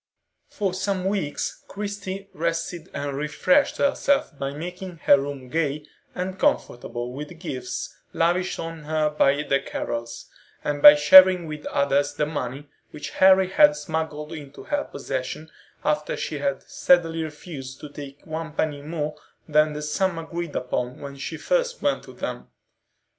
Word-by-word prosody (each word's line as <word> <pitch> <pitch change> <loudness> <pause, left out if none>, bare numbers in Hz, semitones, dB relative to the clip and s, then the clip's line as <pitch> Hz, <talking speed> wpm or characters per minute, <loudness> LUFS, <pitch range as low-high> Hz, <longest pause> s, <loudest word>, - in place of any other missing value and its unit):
For 195 -3 -2
some 190 0 -1
weeks 190 -7 -2
Christie 200 -1 -5
rested 165 +1 -3
and 140 -1 -4
refreshed 150 - +2
herself 280 - +1
by 135 -1 -1
making 180 +4 -7
her 140 - +7
room 140 -2 -5
gay 150 0 -1 0.3
and 185 +1 -4
comfortable 120 - -1
with 145 +3 -6
the 175 - -12
gifts 130 -7 -5 0.2
lavished 175 +3 +1
on 165 -2 -6
her 155 0 +1
by 145 -1 +3
the 140 -2 +2
Carrols, 115 -3 -5 0.4
and 145 -1 -2
by 145 0 +12
sharing 185 +4 +8
with 155 -1 -6
others 140 +1 +1
the 150 - +1
money 145 -2 -4 0.2
which 150 - -7
Harry 190 0 +5
had 295 +5 +6
smuggled 160 - -4
into 145 -3 -9
her 290 -1 -1
possession 140 +3 -5 0.3
after 150 0 0
she 150 - -3
had 140 -1 -1
steadily 165 -2 +2
refused 150 -4 -8
to 150 - -7
take 140 -1 -10
one 160 0 -5
penny 145 -2 -1
more 150 0 -3 0.3
than 150 0 +3
the 150 0 -5
sum 170 +4 0
agreed 165 0 -5
upon 125 0 -2
when 140 -1 -7
she 140 +4 -5
first - - 0
went - - +1
to - - -12
them. - - -5
155 Hz, 155 wpm, -24 LUFS, 145-180 Hz, 0.4 s, by